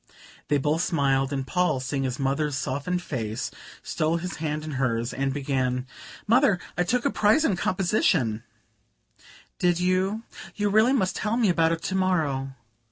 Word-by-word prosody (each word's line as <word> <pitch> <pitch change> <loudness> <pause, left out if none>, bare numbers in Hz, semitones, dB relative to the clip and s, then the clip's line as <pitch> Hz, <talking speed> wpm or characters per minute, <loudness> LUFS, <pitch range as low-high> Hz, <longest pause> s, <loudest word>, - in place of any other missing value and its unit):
They 145 - +2
both 150 +4 +1
smiled, 135 -5 +1
and 135 -2 -2
Paul, 180 -2 +1
seeing 135 +1 -2
his 130 -1 -2
mother's 140 +1 0
softened 145 +7 -2
face, 115 -7 -3 0.3
stole 160 +2 0
his 175 +1 -5
hand 155 -1 -3
in 155 - -5
hers 120 -3 -1
and 135 0 -1
began: 130 -2 -1 0.4
"Mother, 230 -2 +4 0.2
I - - 0
took 240 +8 0
a 280 - +2
prize 215 +10 +3
in 200 - +2
composition 175 - +1 0.6
" - - -25
"Did 175 -1 +2
you? 185 +4 +1 0.3
You 205 -1 0
must 220 -2 +3
tell 215 +2 -1
me 225 -5 +3
about 165 -2 +3
it 165 0 -5
to - - -2
morrow. 150 -8 0
155 Hz, 165 wpm, -26 LUFS, 135-185 Hz, 0.6 s, Mother